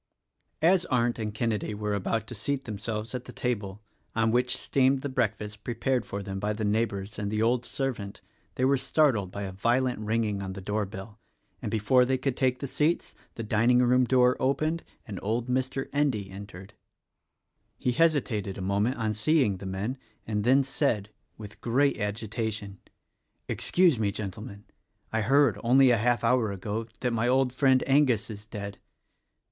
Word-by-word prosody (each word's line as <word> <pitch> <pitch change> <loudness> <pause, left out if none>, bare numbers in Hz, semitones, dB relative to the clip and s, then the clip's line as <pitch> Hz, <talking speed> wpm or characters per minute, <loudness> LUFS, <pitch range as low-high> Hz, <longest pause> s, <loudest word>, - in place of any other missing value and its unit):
As 180 +2 +5
Arndt 120 -2 +1
and 105 -1 -2
Kenedy 110 -1 -2
were 105 0 -2
about 105 +3 -1
to 120 - -8
seat 135 +5 -2
themselves 110 +1 -4
at 125 -1 -4
the - - -9
table, 105 -5 -3 0.3
on 115 0 +2
which 125 +2 +1
steamed 135 0 +2
the 145 - -2
breakfast 105 -4 -2
prepared 125 -1 -1
for 100 0 -4
them 95 0 -5
by 105 +2 -1
the 110 0 -3
neighbors 105 -1 -1
and 100 -1 -2
the 110 +1 +1
old 120 +1 +1
servant, 120 -8 -3 0.4
they 130 - +1
were 140 +1 +4
startled 125 - +2
by 100 +2 -6
a 95 - -4
violent 120 +5 +1
ringing, 110 -2 -1
of 95 -1 -5
the - - -6
doorbell, 105 +1 -4 0.4
and - - -3
before 115 +4 +3
they 130 +1 +1
could 130 0 -1
take 130 -1 +1
the 140 - -5
seats 150 +5 0 0.2
the 115 - -5
dining 115 +3 +3
room 125 +1 +4
door 125 0 +4
opened 155 +5 0 0.2
and 100 -4 -6
old 115 +4 -1
Mr. 130 +1 -1
Endy 130 -10 0
entered. 95 -1 -10 1.0
He 125 - 0
hesitated 125 - +1
a - - -5
moment 100 +7 0
on 110 -2 -1
seeing 110 -2 +2
the 95 - -7
men 100 +8 -3 0.3
and 105 -2 -1
then 130 +4 +5
said 115 -7 -1
— - - -45
with 105 -1 -11
great 135 +4 +2
agitation 105 -1 -3 0.4
— - - -50
"Excuse 175 -9 +2
me, 105 -2 +1
Gentlemen; 105 +1 -7 0.5
I 110 - +1
heard, 135 +2 +3
only 130 +2 +6
a 120 - +4
half 120 +2 +1
hour 120 -5 +2
ago, 105 +3 -4
that 125 -2 0
my 115 +1 +1
old 130 0 +2
friend 130 -1 +3
Angus 135 -6 +3
is 105 0 -10
dead. 100 -2 -7
115 Hz, 175 wpm, -28 LUFS, 105-130 Hz, 1.0 s, only